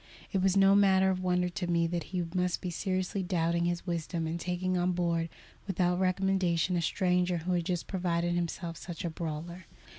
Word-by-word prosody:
It 195 - +1
was 190 +1 +3
no 195 0 +6
matter 190 -1 +5
of 185 -1 -2
wonder 180 -1 +1
to 175 0 -4
me 170 -1 +2
that 170 -1 -2
he 180 -2 -2
must 180 -1 0
be 180 - -4
seriously 185 +2 -1
doubting 170 -1 0
his 175 0 -1
wisdom 170 -1 -2
in 165 +2 -3
taking 180 +1 -1
on 180 0 +1
board 170 -1 0 0.4
without 180 -2 +1
recommendation 185 -2 +1
a 175 - +1
stranger 180 +1 +1
who 170 +3 -3
had 175 -2 +1
just 175 -1 -1
proved 175 -3 -1
himself 175 -1 -2
such 175 -1 -6
a 170 - -2
brawler. 170 +2 -6
180 Hz, 190 wpm, -30 LUFS, 170-185 Hz, 0.4 s, no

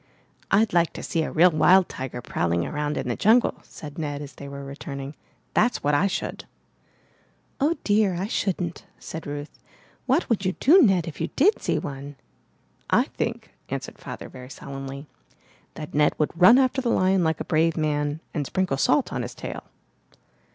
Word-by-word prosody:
'Td 215 0 +3
like 170 -1 +3
to - - -7
see 165 - -1
a - - -2
real 175 +3 +5
wild 180 +4 +5
tiger 125 -2 -6
prowling 85 0 0
around 150 0 -2
in - - -3
the 120 - -1
jungle,'' 230 +4 +3
said 150 0 -10
Ned 145 -2 -3
as 145 -2 -8
they 140 - -10
were 140 0 -7
returning. 140 0 -7 0.4
''That's 240 +3 +2
what 145 - +2
I 175 +7 +3
should!" 195 - -4 1.2
''Oh, 310 +4 +2
dear! 205 -3 +2
I 185 - -2
shouldn't," 185 -6 -2
said 160 -1 -8
Ruth. 145 +1 -7 0.5
"What 270 +7 +2
would 230 -5 +1
you 185 -1 0
do, 350 +8 +6
Ned, 190 - +4
if 160 - -7
you - - 0
did 385 +10 +4
see - - 0
one?" 140 0 -6 0.7
"I - - +2
think," - - -4 0.2
answered - - -5
Father - - -7
very 125 0 -11
solemnly, 135 +1 -7 0.7
"that 150 - -7
Ned 150 0 +3
would 150 - 0
run 185 +8 +7
after 265 0 +2
the 245 - -1
lion 185 -3 +3
like 160 -1 +1
a - - -4
brave 165 +1 +2
man 150 0 -1
and 145 -5 -2
sprinkle 185 -7 0
salt 285 - +2
on - - -2
his - - -6
tail!" - - -7
160 Hz, 180 wpm, -25 LUFS, 145-195 Hz, 1.2 s, run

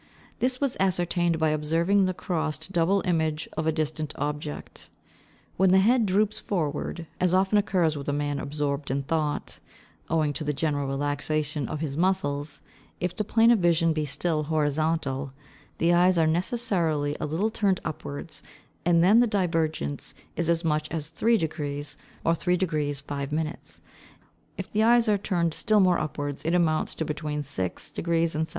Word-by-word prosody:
This 255 0 0
was 280 -3 0
ascertained 175 -2 +1
by 160 -1 +2
observing 165 +6 +2
the 185 - 0
crossed 160 -2 -3
double 190 +2 +2
image 160 -3 0
of 155 0 -1
a - - +4
distant 155 -1 -3
object. 150 +1 -5 0.7
When 190 +1 +4
the 190 - +6
head 225 +3 +4
droops 210 +3 +1
forward, 165 -1 -2
as 180 0 +3
often 195 +2 +3
occurs 180 -6 +1
with 140 -1 -4
a - - +2
man 145 0 -1
absorbed 145 0 -2
in 140 +1 -1
thought, 150 0 -2 0.5
owing 155 -2 +1
to 155 - -4
the 150 0 -1
general 145 -1 -1
relaxation 145 +1 -1
of 155 - -4
his 145 -4 -3
muscles, 150 -5 0 0.4
if 180 0 -2
the 215 - -1
plane 225 +2 +4
of 235 - +4
vision 165 -2 +3
be 155 -1 -1
still 155 +2 0
horizontal, 150 -2 0 0.4
the 170 +1 +3
eyes 180 +1 +4
are 165 - +4
necessarily 165 -5 0
a - - -2
little 185 +9 0
turned 200 -4 +1
upwards, 155 0 -6 0.4
and 170 -1 +4
then 205 +6 +6
the 240 - +4
divergence 165 - -1 0.2
is 170 -1 -1
as 170 0 +1
much 155 -1 +1
as 160 -1 -4
3°, 155 -8 -1 0.3
or 165 - +4
3° 155 -5 0
5': 145 +2 -4 0.8
if - - -6
the 215 - +1
eyes 235 +1 +5
are 205 -2 +3
turned 170 -5 0
still 215 +5 +2
more 180 -3 +4
upwards, 145 -2 -4
it 165 +3 +1
amounts 160 -3 +1
to 160 - -2
between 150 -1 -3
6° 95 -10 -3 0.4
and 160 +1 -1
7°. - - -11
160 Hz, 165 wpm, -26 LUFS, 150-185 Hz, 0.8 s, the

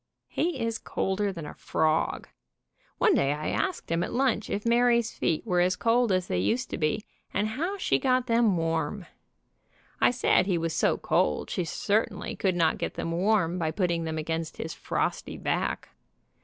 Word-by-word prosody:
He 335 -5 -1
is 230 -1 -1
colder 195 +1 -1
than 165 -5 -7
a - - -7
frog. 155 0 0 0.7
One - - +4
day 140 +1 +2
I 150 +1 -3
asked 375 - -2
him 165 0 +1
at - - -2
lunch 250 -4 +1
if 205 - -3
Mary's 235 0 +3
feet 160 - -1
were 180 -1 +1
as 180 +1 +2
cold 235 +1 +2
as 185 -1 +1
they 90 - -1
used 240 - 0
to - - -2
be, 155 +7 0 0.3
and 210 +2 0
how 340 - -2
she 380 - +1
got 255 -1 +2
them 230 -5 +3
warm. 165 +3 -1 1.0
I - - +6
said 245 -5 +2
he. 185 -3 +2
was 165 -1 -1
so - - +2
cold 75 - 0
she 180 - -1
certainly 205 +6 -1
could 190 -2 0
not 165 -2 +2
get - - -3
them 165 - -3
warm 180 -1 +1
by 160 -2 0
put 180 +3 0
ting 165 -1 -1
them 160 0 -3
against 160 +1 -3
his 160 - -4
frosty - - -2
back. - - -2
185 Hz, 185 wpm, -27 LUFS, 165-230 Hz, 1.0 s, I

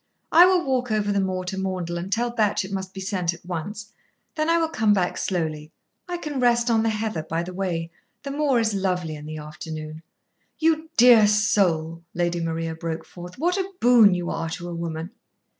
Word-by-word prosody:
I 350 +2 +8
will 370 -3 +2
walk 250 -3 0
over 210 -1 +1
the 200 - +1
moor 185 -1 -1
to 190 +1 -4
Maundell 180 -3 -3
and 185 +3 -6
tell 240 +3 0
Batch 210 -4 +1
it 190 - -9
must 190 -1 -4
be 195 - -9
sent 180 -3 -1
at 170 - -19
once. 205 +6 -6 0.4
Then 310 +1 -1
I 335 - +4
will 330 -1 +1
come 220 -10 +2
back 180 -2 0
slowly. 155 -4 -3 0.4
I 350 - -2
can 300 -5 -4
rest 240 -1 +3
on 225 -1 +3
the 225 - +1
heather 215 -5 -2
by 165 +2 -3
the 180 +1 -7
way. 170 -3 -3 0.3
The 280 - -4
moor 280 -3 +2
is 220 -2 +1
lovely 180 -5 -1
in 150 0 -9
the 155 0 -6
afternoon." 155 0 -7 0.6
"You 320 0 +1
dear 235 -3 +8
soul!" 180 -6 +1
Lady 175 0 0
Maria 165 0 -2
broke 165 0 -5
forth. 175 0 -11
"What 350 +6 +1
a 385 0 -2
boon 235 -6 +6
you 175 -1 -3
are 165 0 -3
to 175 +2 -6
a - - -5
woman!" 165 +1 -5
190 Hz, 210 wpm, -24 LUFS, 170-235 Hz, 0.6 s, I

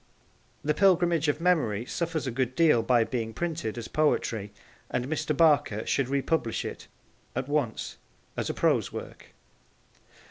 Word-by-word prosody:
The 150 - +2
Pilgrimage 175 -3 +3
of 145 +1 +1
Memory 145 - +1
suffers 165 +1 -2
a 130 - -2
good 130 +1 -1
deal 155 -7 +5
by 120 0 +3
being 115 -2 -3
printed 165 -10 -3
as 115 - -5
poetry, 115 -9 0 0.4
and 125 - -1
Mr. 155 -1 -1
Barker 145 -9 +3
should 135 -2 0
republish 140 -3 0
it - - -7 0.5
at 130 +1 -2
once 145 -7 -2 0.4
as - - -2
a - - -1
prose - - +2
work. - - -8
140 Hz, 145 wpm, -28 LUFS, 120-160 Hz, 0.5 s, deal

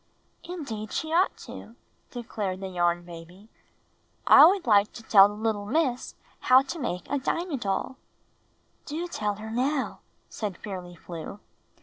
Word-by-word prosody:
''Indeed 245 - -6
she 315 0 -3
ought 365 +3 +2
to," 230 - -10 0.3
declared 210 -6 -4
the 190 0 -5
Yarn 175 -1 0
Baby. 175 +5 -12 0.8
"I 285 - +9
would 380 +1 +2
hke 205 -3 +4
to 230 - -10
tell 200 -3 +7
the 205 - -8
httle 210 -1 -2
Miss 270 -5 0 0.2
how 255 +1 +5
to 300 +5 -6
make 180 - -3
a 285 - -1
Dinah 335 +3 -2
DoU." 235 +4 -3 0.9
''Do 325 +3 -3
tell 210 -9 -2
her 220 +2 -8
now," 265 +4 -1 0.3
said 205 -5 -5
Fairly 180 -3 -7
Flew. 170 +3 -8
220 Hz, 145 wpm, -27 LUFS, 195-275 Hz, 0.9 s, I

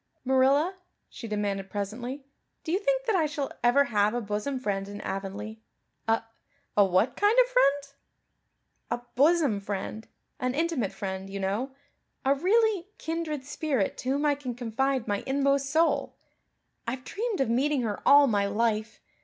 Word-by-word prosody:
"Marilla," 275 +8 +3 0.3
she 230 - -8
demanded 200 -2 -2
presently, 240 +8 -5 0.4
"do 320 - -3
you 370 - +2
think - - 0
that 445 -4 +1
I 325 -4 +3
shall 295 -2 -3
ever 245 +4 +5
have 215 -4 +1
a - - +1
bosom 215 +5 -3
friend 195 -5 -2
in 205 0 -7
Avonlea?" 205 +3 -5 0.5
"A 225 0 +2 0.5
a 205 - +6
what 190 +4 +2
kind 415 +3 +3
of - - +6
friend?" 285 - +3 1.1
"A 240 0 -2
bosom 290 -6 +3
friend 205 +2 -5 0.3
an 255 +1 -1
intimate 315 - 0
friend, 195 0 -5
you 200 0 -5
know 215 +8 -2 0.5
a 270 - +5
really 395 +4 +2
kindred 320 -4 -3
spirit 285 -7 -1
to 255 - -3
whom 285 +3 +1
I 295 - +4
can 270 -4 -5
confide 250 +2 -1
my 205 -1 0
inmost 275 0 +1
soul. 320 +3 +1 0.7
I've 250 +2 -3
dreamed 440 - -3
of 265 -4 +1
meeting 275 +3 +2
her 210 -3 -3
all 285 0 +7
my 205 -5 +1
life. 220 +1 -1
260 Hz, 160 wpm, -28 LUFS, 210-295 Hz, 1.1 s, all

